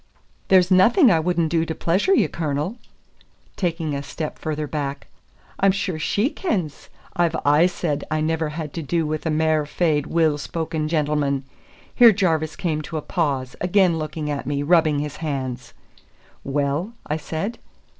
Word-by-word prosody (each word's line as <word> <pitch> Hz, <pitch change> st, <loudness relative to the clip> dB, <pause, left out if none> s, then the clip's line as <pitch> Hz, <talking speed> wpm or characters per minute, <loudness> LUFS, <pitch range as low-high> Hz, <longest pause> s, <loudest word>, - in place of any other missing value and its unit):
"There's 185 Hz, -1 st, +4 dB
nothing 230 Hz, -, +6 dB
I 165 Hz, -, +4 dB
wouldna 170 Hz, 0 st, +1 dB
do 165 Hz, +1 st, +1 dB
to 160 Hz, -1 st, -4 dB
pleasure 190 Hz, -, +2 dB
ye, -, -, +3 dB
Cornel," 155 Hz, +4 st, -2 dB, 0.8 s
taking 165 Hz, -4 st, -2 dB
a 140 Hz, -, -2 dB
step 150 Hz, +2 st, -6 dB
further 155 Hz, -1 st, -3 dB
back. 140 Hz, -2 st, -4 dB, 0.5 s
"I'm 195 Hz, 0 st, +5 dB
sure 185 Hz, -4 st, -3 dB
she 205 Hz, -, 0 dB
kens 185 Hz, -, -3 dB, 0.3 s
I've 170 Hz, -2 st, +1 dB
aye 150 Hz, +4 st, +5 dB
said 160 Hz, -5 st, -2 dB
I 155 Hz, -, 0 dB
never 160 Hz, 0 st, 0 dB
had 150 Hz, -1 st, -6 dB
to 165 Hz, -, -4 dB
do 165 Hz, +2 st, -1 dB
with 155 Hz, +1 st, -3 dB
a -, -, +1 dB
mair 155 Hz, 0 st, +2 dB
fair, 155 Hz, -2 st, +1 dB
weel 160 Hz, -3 st, +2 dB
spoken 160 Hz, 0 st, -3 dB
gentleman 150 Hz, -3 st, 0 dB, 0.3 s
" -, -, -27 dB
Here 235 Hz, -2 st, +8 dB
Jarvis 160 Hz, -6 st, 0 dB
came 155 Hz, -3 st, -2 dB
to 155 Hz, +1 st, -6 dB
a 150 Hz, -, -4 dB
pause, 140 Hz, -7 st, -1 dB
again 180 Hz, -2 st, +3 dB
looking 155 Hz, 0 st, -4 dB
at 140 Hz, -3 st, -4 dB
me, 145 Hz, 0 st, -1 dB
rubbing 160 Hz, -1 st, +3 dB
his 150 Hz, 0 st, -4 dB
hands. 130 Hz, -5 st, -4 dB, 0.7 s
"Well?" 145 Hz, -, -1 dB
I 150 Hz, -, -1 dB
said. 165 Hz, +9 st, -4 dB
160 Hz, 165 wpm, -22 LUFS, 150-175 Hz, 0.8 s, Here